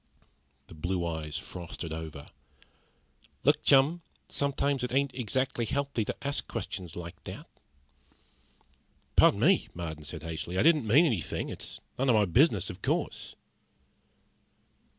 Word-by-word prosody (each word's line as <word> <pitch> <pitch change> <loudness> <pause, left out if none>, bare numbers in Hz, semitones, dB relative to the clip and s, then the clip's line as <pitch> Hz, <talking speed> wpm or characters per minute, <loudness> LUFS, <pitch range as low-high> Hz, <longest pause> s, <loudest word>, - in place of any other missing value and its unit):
The - - -14
blue 85 +3 -2
eyes 80 -2 -3
frosted 85 -2 -6
over. 80 -3 -6 1.2
"Look, - - +4
chum, 140 +5 +4 0.3
sometimes 140 -1 0
it 125 - -2
ain't 135 0 +1
exactly 130 +1 -1
healthy 140 -1 -1
to - - -3
ask 140 - -1
questions 90 -5 -5
like 85 -1 -8
that." - - -7 1.7
"Pardon 100 - +6
me," 180 +8 +4
Marden 80 -3 -5
said 75 +1 -7
hastily. 80 +2 -4
"I - - +4
didn't 155 -6 +4
mean 140 +11 +6
anything. 110 - -1
It's - - -6 0.2
none 135 0 +2
of 120 - +6
my 105 -1 +5
business, 100 - +3
of 90 - -12
course." - - -2
105 Hz, 130 wpm, -29 LUFS, 85-135 Hz, 1.7 s, Pardon